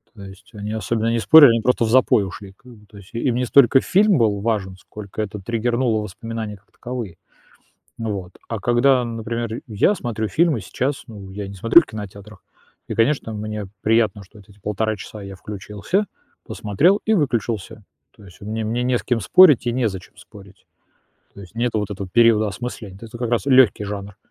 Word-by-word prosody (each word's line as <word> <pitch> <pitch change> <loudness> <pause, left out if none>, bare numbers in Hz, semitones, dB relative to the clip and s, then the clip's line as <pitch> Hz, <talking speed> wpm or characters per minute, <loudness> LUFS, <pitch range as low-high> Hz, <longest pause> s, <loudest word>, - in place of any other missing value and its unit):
То 100 - -11
есть 95 -1 -13
они 105 0 -6
особенно 110 +1 -1
не 115 - 0
спорили, 145 +2 +8
они 115 -1 +2
просто 125 -1 +1
в 110 - 0
запой 115 -4 +4
ушли, 95 0 -10
как 125 +3 -18
бы, 105 -2 -17
то 105 - -20
есть 100 -1 -14
и 115 - -3
им 120 -1 0
не 125 - 0
столько 135 +1 +5
фильм 200 -2 +3
был 105 -4 +1
важен, 100 -3 -2
сколько 105 +2 -8
это 105 0 -5
триггернуло 120 +1 0
воспоминания 110 +1 -6
как 100 - -24
таковые. 120 -8 -7 0.8
Вот. 100 -5 -5
А 115 -3 -4
когда, 125 +2 +3
например, 115 0 -4
я 120 - +1
смотрю 110 -6 -3
фильмы 155 - +1
сейчас, 135 +8 -3
ну, 100 -3 -10
я 100 0 -6
не 100 - -9
смотрю 115 - +6
в - - -14
кинотеатрах, 105 -2 -10 0.4
и, - - -5
конечно, 115 -1 +1
мне 105 -1 -5 0.2
приятно, 110 -2 +1
что 105 +3 -18
эти 100 0 -19
1,5 105 +2 -2
часа 105 +1 -10
я 100 0 -8
включился, 105 - -3 0.4
посмотрел 165 - +1
и 220 - +2
выключился, 115 - -2 0.3
то 105 - -18
есть 90 -2 -16
мне 110 +2 -4
мне 120 +3 -2
не 125 -1 +1
с - - -3
кем 120 -2 0
спорить 150 - +5
и 120 - +1
незачем 110 -7 -3
спорить, 100 -2 -16 0.7
то - - -12
есть 95 +4 -15
нет 120 0 -1
вот 105 -2 -2
этого 100 -2 -6
периода 110 0 +4
осмысления, 100 -1 -7
то 115 - -12
есть 110 - -13
это 120 - -7
как 120 - -2
раз 120 - +1
лёгкий 130 -6 +4
жанр. 100 0 -7
110 Hz, 200 wpm, -21 LUFS, 100-120 Hz, 0.8 s, спорили